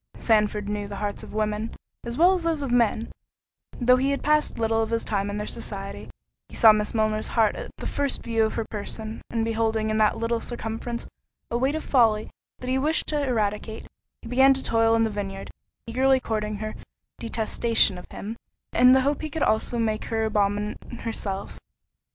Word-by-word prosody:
Sandford 210 -2 +1
knew 205 0 -3
the 200 - -7
hearts 205 0 -3
of - - -10
women, 215 +1 -1 0.3
as 235 +1 -4
well 355 +3 +6
as 370 - -1
those 325 -3 -1
of 270 - -3
men, 235 -2 +2 0.7
though 250 0 +5
he 265 +2 +1
had 280 - -1
passed 300 0 +2
little 225 0 +1
of 220 - -1
his 230 0 -1
time 200 -1 -1
in 205 - -3
their 210 - -3
society—he 200 -4 -8
saw 225 - +8
Miss 210 +1 -1
Milner's 215 -1 +1
heart 220 -2 +4
at - - -6
the - - -7
first 285 -1 -1
view 225 -1 +1
of 220 - -1
her 225 - -2
person; 220 +1 -5
and 225 -1 -1
beholding 220 -1 0
in 215 - 0
that 215 -1 +3
little 230 0 0
circumference 235 0 -5 0.5
a 235 - +1
weight 270 +4 +1
of 315 - -3
folly 225 -5 +2 0.3
that 250 - -6
he 260 - +2
wished 310 +4 +2
to 295 -2 0
eradicate, 220 -3 -2 0.4
he - - -8
began 265 +3 +5
to 265 - -1
toil 225 0 +3
in 225 - +3
the 220 - 0
vineyard, 195 -1 -5 0.3
eagerly 260 +3 +3
courting 215 -3 -2
her 215 +1 -5 0.5
detestation 225 -3 +2
of - - -14
him, 220 +3 -7 0.4
in 250 +1 +7
the 265 - +5
hope 285 +2 0
he 310 - -4
could 310 +1 -2
also 220 +2 +1
make 220 -2 -1
her 225 -1 -1
abominate 205 0 0 0.2
herself. 200 -4 -4
225 Hz, 195 wpm, -25 LUFS, 215-245 Hz, 0.7 s, saw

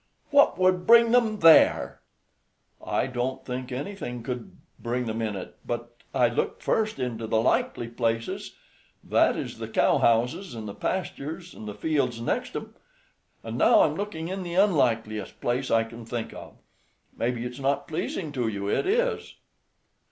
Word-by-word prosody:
"What 285 0 +5
would 185 -1 +2
bring 235 0 +7
them 225 -3 +2
there?" 165 -1 +6 0.8
"I - - 0
don't 130 +1 -3
think 130 0 -5
anything 125 - -5
could 125 +10 -6 0.2
bring 125 +1 -2
them 110 0 -3
in 110 -2 -2
it; 95 - -8
but 120 0 -5 0.2
I 125 -2 +3
looked - - -2
first 215 -5 0
into 120 -4 -3
the 110 0 +2
likely 115 0 +1
places, 115 -1 -2 0.5
that - - +3
is - - -5
the - - -5
cowhouses, 125 - +2
and 110 -1 -6
the 100 - -6
pastures, 170 - -4
and 110 - -9
the 105 - -6
fields 140 -7 0
next 120 - -2
'em, - - -6 0.7
and - - -5
now - - +6
I'm - - +3
looking 170 -6 -4
in 190 +2 -4
the 175 -1 -5
unlikeliest 115 - +1
place 125 +2 -1
I 115 0 +3
can 115 +1 -10
think 115 0 -5
of. - - -11 0.6
Maybe 120 0 -2
it's 125 +2 -6
not 140 +1 0
pleasing 160 0 -3
to 125 -5 -1
you 100 -2 -3
it 105 - 0
is." 475 +3 0
125 Hz, 160 wpm, -26 LUFS, 115-180 Hz, 0.8 s, bring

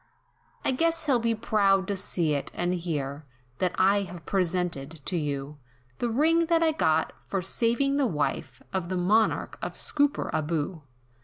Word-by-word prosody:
"I - - +3
guess 330 +4 +1
he'll 270 -5 +3
be 230 0 +1
proud 200 -3 +2
to 200 - -1
see 175 -5 -1
it, 140 - -2
and 175 +1 0
hear, 150 -5 -3 0.4
That 180 -1 +1
I 195 +2 +4
have 180 -4 -8
presented 175 -6 -1 0.2
to 185 - -2
you, 145 -2 -3 0.4
The 240 - 0
ring 325 +7 +3
that 330 0 +3
I 320 - +4
got, 160 - +1
for 195 -2 -2
savin' 240 +8 +1
the 280 -3 +3
wife, 150 -8 -2
Of 185 -2 -2
the 185 - -1
Monarch 210 +5 +2
of - - -3
Scooperaboo. 165 - 0
190 Hz, 160 wpm, -27 LUFS, 165-235 Hz, 0.4 s, I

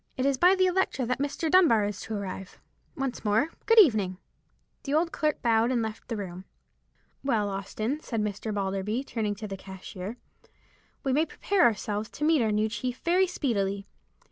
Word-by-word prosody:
It 260 - 0
is 275 -1 +3
by 360 +7 +5
the 375 -1 +3
Electra 365 -8 +1
that 250 +2 -1
Mr. 285 +3 -2
Dunbar 310 - +5
is 205 -2 -4
to 220 - -5
arrive. 190 -2 -6 0.4
Once 270 -2 -3
more, 220 +8 +2 0.2
good 455 - +5
evening!" 215 - +5 0.6
The 280 +1 -2
old 335 +2 +2
clerk 305 -1 -1
bowed 230 0 +3
and 245 -3 +1
left 220 0 -6
the 230 - -3
room. 185 -2 -6 0.8
"Well, 220 -7 +1
Austin," 215 +7 -3
said 230 -7 -4
Mr. 210 +1 -2
Balderby, 200 +4 -1
turning 215 -6 -2
to 215 +1 -6
the 195 -1 -6
cashier, 190 +3 -8 0.9
"we 270 -3 +1
may 310 +4 +2
prepare 400 -2 0
ourselves 210 -1 0
to 300 - -5
meet 310 -2 +4
our 220 -2 +1
new 210 +1 +2
chief 240 +4 -3
very 365 +2 +4
speedily. 200 - -1
225 Hz, 180 wpm, -28 LUFS, 205-285 Hz, 0.9 s, by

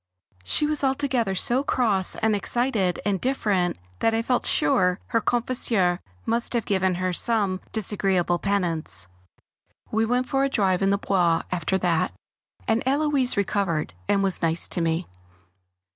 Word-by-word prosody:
She 300 - +1
was 300 -1 -1
altogether 265 -7 0
so 245 +8 +2
cross 210 -9 +1
and 220 -1 +1
excited 215 -4 0
and 200 -3 0
different 205 -9 0 0.2
that 225 - +2
I 225 - 0
felt 250 +1 0
sure 180 +5 +2
her 230 - +1
confesseur 225 -7 +1 0.3
must 235 +2 +1
have 235 -3 -1
given 190 -2 +1
her 185 0 -2
some 200 -2 +1
disagreeable 190 -4 +1
penance. 170 - 0 0.8
We 220 +1 +1
went 250 +2 0
for 270 +2 +1
a 275 - +1
drive 190 -7 +1
in 195 - +2
the 200 - +2
Bois 175 -5 +1
after 180 +1 0
that, 175 -3 0 0.5
and 225 0 +1
Héloise 275 -3 +1
recovered, 190 - -1
and 195 -1 +2
was 195 -2 +1
nice 165 0 +1
to 175 - +1
me. 165 +1 0
200 Hz, 150 wpm, -24 LUFS, 180-240 Hz, 0.8 s, so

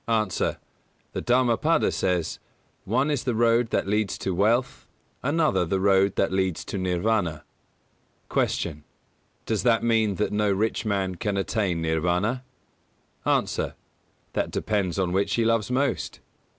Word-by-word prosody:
A. 110 -2 +2 0.9
The - - -3
Dhammapada 125 +6 +2
says: 90 -3 -1 0.5
"One 130 +8 +1
is 140 -4 -1
the 125 -3 -1
road 115 0 +3
that - - 0
leads 105 0 0
to 95 - -2
wealth, 120 +8 +1 0.3
another 145 - +2
the 95 +3 -1
road 95 0 +3
that 95 - +1
leads 95 -3 -1
to - - -4
Nirvāna." 90 -3 0 0.9
214. - - 0
Q. 75 - -20 0.6
Does 110 -2 0
that 115 -2 +3
mean 110 -3 +2
that 105 +3 -1
no 105 -1 +2
rich 110 +3 0
man 100 -3 0
can 100 +2 -1
attain 95 -4 -1
Nirvāna? 90 +9 0 0.9
A. - - 0 0.6
That - - -1
depends 100 -5 -1
on 95 -2 0
which 95 +2 +1
he 115 - +1
loves 115 -1 +1
most. 130 +1 -1
105 Hz, 140 wpm, -25 LUFS, 95-115 Hz, 0.9 s, road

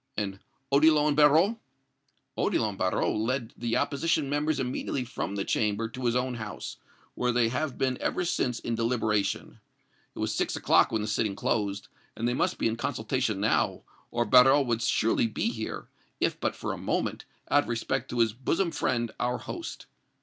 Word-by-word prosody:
"And 100 -2 -2 0.3
Odillon 150 +1 +5
Barrot?" 155 +9 +5 0.8
"Odillon 110 -3 0
Barrot 95 -1 0
led 115 +2 -1
the 115 -1 -1
opposition 145 -1 0
members 150 +1 0
immediately 130 +1 -2
from 100 -4 -4
the 100 - -2
Chamber 105 +1 0
to 125 +2 -6
his 120 0 +2
own 125 0 0
house, 110 -3 -6 0.4
where 125 0 0
they 120 -1 +2
have 135 +3 -2
been 130 -1 0
ever 180 - 0
since 125 -7 0
in 120 - -3
deliberation. 115 -3 -1 0.6
It - - -14
was - - -1
six - - -1
o'clock - - +4
when 110 -2 0
the - - -3
sitting 105 -1 0
closed, 100 -1 -1 0.3
and 115 - -1
they 120 - +1
must - - 0
be - - +1
in 115 0 -1
consultation - - -1
now, - - +1 0.3
or 120 0 0
Barrot 135 +5 +6
would 115 -2 0
surely 115 +1 +2
be 115 - -1
here, 110 -2 -5 0.3
if - - 0
but - - -1
for - - -3
a - - -7
moment, - - -2 0.3
out 145 - +6
of - - -9
respect 115 -1 -2
to 120 - 0
his 110 -2 +2
bosom 165 - 0
friend, 120 -6 -1
our 125 0 0
host. 340 - -7
120 Hz, 180 wpm, -28 LUFS, 110-140 Hz, 0.8 s, Barrot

